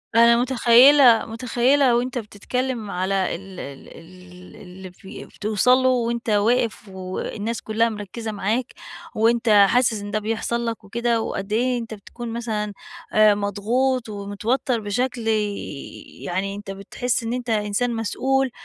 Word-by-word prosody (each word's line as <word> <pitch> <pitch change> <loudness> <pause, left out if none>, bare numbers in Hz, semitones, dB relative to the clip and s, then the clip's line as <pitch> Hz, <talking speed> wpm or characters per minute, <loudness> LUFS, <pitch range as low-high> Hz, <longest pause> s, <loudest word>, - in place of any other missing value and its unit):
أنا 235 0 +6
متخيلة 250 0 +6
متخيلة 245 +3 +2
وأنتَ 250 +1 -1
بتتكلم 230 +1 -4
على 190 0 -1
ال 190 +1 -10
ال 140 -1 -9
ال 180 +1 -15
اللي 185 0 -11
فِ 180 - -22 0.3
بتوصَل 215 +4 +3
له 260 0 +2
وأنتَ 235 -2 -1
واقف 220 0 +1
والناس 195 +4 -5
كلها 225 +2 +1
مركزة 215 +1 -6
معاك، 220 +5 -2 0.4
وأنتَ 230 +1 +2 0.2
حاسس 235 -3 +2
إن 205 0 -7
ده 215 - 0
بيحصل 225 +2 -2
لك 225 -1 -4
وكده، 235 +2 -1
وقد 195 -1 -4
ايه 250 +2 +1
أنتَ 230 -1 -7
بتكون 230 +3 -8
مثلًا 215 -3 -3 0.4
آآ 215 -1 +5
مضغوط 225 +5 -1
ومتوتر 210 +5 -2
بشكل 235 +3 -2
ي 210 -2 +1 0.7
يعني 195 +3 -3
أنتَ 205 -1 -7
بتحس 230 +5 -3
إن 230 +1 -3
أنتَ 250 -1 -4
إنسان 220 +3 0
مسئول، 265 +4 0
225 Hz, 140 wpm, -22 LUFS, 205-245 Hz, 0.7 s, أنا